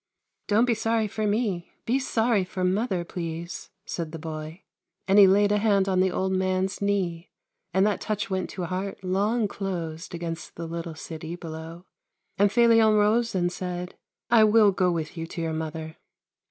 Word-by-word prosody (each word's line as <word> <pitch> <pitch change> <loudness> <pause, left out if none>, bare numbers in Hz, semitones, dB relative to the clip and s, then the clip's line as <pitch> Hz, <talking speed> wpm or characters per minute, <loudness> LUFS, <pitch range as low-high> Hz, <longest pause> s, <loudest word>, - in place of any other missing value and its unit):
" - - -54
Don't 215 +3 +4
be 245 - +2
sorry 225 0 0
for 215 +1 -2
me; 205 -5 -1
be 250 +4 +2
sorry 230 -5 +1
for 185 0 -4
mother, 185 -1 0
please," 170 0 -6 0.2
said 165 -3 -4
the 165 - -6
boy, 155 +2 -7 0.4
and 195 +2 +5
he 200 - +9
laid 205 +2 +4
a 210 - +3
hand 200 -3 +3
on 185 -1 +2
the 190 0 +4
old 190 +1 -1
man's 185 +1 0
knee, 185 -4 -1 0.4
and 190 +3 +3
that 210 -1 0
touch 210 -1 -2
went 190 -1 -2
to 185 - -5
a - - -1
heart 190 +2 -4
long 205 +5 +1
closed 175 -4 -5
against 170 0 -6
the 170 - -5
little 165 0 -5
city 160 +1 -7
below; 165 +1 -8 0.5
and 205 0 +4
Felion 225 -1 +5
rose 215 +2 +2
and 175 -1 +1
said: 180 0 -5 0.2
" - - -65
I 230 -2 +7
will 215 -1 +6
go 185 -1 +2
with 160 -3 -3
you 165 0 -4
to 170 - -7
your 160 -1 -2
mother." 160 0 -5
185 Hz, 190 wpm, -26 LUFS, 170-210 Hz, 0.5 s, he